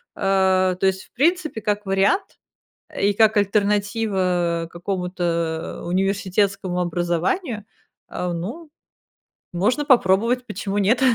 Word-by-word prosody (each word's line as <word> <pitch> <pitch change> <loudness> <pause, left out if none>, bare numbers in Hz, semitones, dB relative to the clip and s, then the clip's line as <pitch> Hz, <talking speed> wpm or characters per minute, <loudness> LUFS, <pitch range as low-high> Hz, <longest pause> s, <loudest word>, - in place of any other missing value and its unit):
А, 190 -1 +2
то 185 - -2
есть, 190 0 +1
в - - -30
принципе, 310 -3 0
как 210 0 -1
вариант 195 - +1 0.6
и 205 +1 +2
как 220 +1 +3
альтернатива 200 -4 +1
какому-то 175 -3 -3
университетскому 195 0 0
образованию, 180 - -1 0.4
а, 180 -1 -3
ну, 230 - -6 0.8
можно 210 +12 +1
попробовать, 240 -1 +3
почему 200 -3 -4
нет. 210 +6 +2
195 Hz, 100 wpm, -22 LUFS, 180-215 Hz, 0.8 s, как